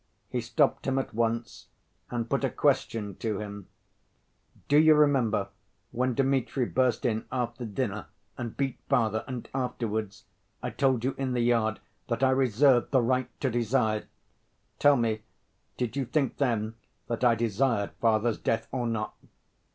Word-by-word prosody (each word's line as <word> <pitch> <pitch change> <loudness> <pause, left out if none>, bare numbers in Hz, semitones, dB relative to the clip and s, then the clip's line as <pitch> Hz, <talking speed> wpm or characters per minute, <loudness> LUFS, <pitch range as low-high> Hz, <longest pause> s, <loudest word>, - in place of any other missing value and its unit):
He 125 - -1
stopped 135 +6 +1
him 135 0 +1
at 135 - -2
once, 115 +1 -2 0.4
and 120 -1 -2
put - - 0
a - - +2
question 105 -3 0
to 110 -3 -2
him: 100 -2 -7 1.0
"Do 145 +1 +5
you 155 0 +7
remember 120 -9 +3 0.4
when 125 0 0
Dmitri 135 -1 +1
burst 130 0 +1
in 110 -2 0
after 120 -1 -2
dinner 110 -1 -3 0.3
and 115 -2 -6
beat 135 -2 -1
father, 115 -4 +2
and 125 -3 -5
afterwards 110 -6 -3 0.4
I - - -2
told 130 -4 +1
you 130 +1 0
in 130 -2 -1
the 120 - +1
yard 115 -2 +2 0.3
that 120 +2 -1
I 130 - +5
reserved 130 0 +4
'the 130 - +3
right 130 +1 -1
to 130 - +1
desire'?... 115 -2 +1 0.7
Tell 145 -1 +6
me, 110 -2 0 0.6
did 125 -1 -2
you 135 -2 -1
think 140 +2 0
then 115 -5 0 0.3
that 120 +1 -3
I 120 -2 +5
desired 115 -1 0
father's 115 -1 +2
death 115 0 -1
or 125 -2 -1
not?" 110 -2 -2
120 Hz, 155 wpm, -28 LUFS, 110-130 Hz, 1.0 s, you